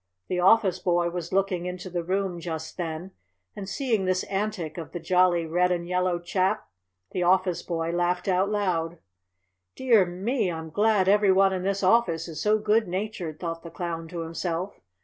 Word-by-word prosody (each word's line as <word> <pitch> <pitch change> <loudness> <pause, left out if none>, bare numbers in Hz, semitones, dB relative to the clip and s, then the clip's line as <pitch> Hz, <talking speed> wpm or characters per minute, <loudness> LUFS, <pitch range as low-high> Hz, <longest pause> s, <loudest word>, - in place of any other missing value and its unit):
The 180 - 0
office 190 -1 +4
boy 175 -1 +1
was 175 -1 -5
looking 185 -2 0
into 180 +1 -6
the 175 -1 -2
room 185 0 -1
just 160 -2 -5
then, 170 +1 -5 0.4
and, 195 -1 -6
seeing 225 -4 0
this 185 0 +1
antic 195 -5 -3
of 165 - -8
the 175 - -4
jolly 175 0 +3
red 180 +3 +2
and 170 -1 -1
yellow 180 0 +1
chap, 185 +4 -1 0.4
the 180 - -2
office 180 0 +2
boy 165 -1 -2
laughed 175 +1 0
out 190 +1 +2
loud. 175 -5 -1 0.8
"Dear 230 -8 +4
me! 190 +3 -1
I'm 160 -1 -6
glad 205 0 +3
every 205 0 +5
one 190 0 +4
in 185 - -2
this 195 +1 -1
office 185 -5 +3
is 160 -2 -6
so 215 +1 +3
good 215 0 +2
natured," 180 -4 -4
thought 165 -1 -4
the 170 - -9
Clown 165 -1 -5
to 170 0 -5
himself. 165 +3 -4
180 Hz, 180 wpm, -26 LUFS, 170-195 Hz, 0.8 s, every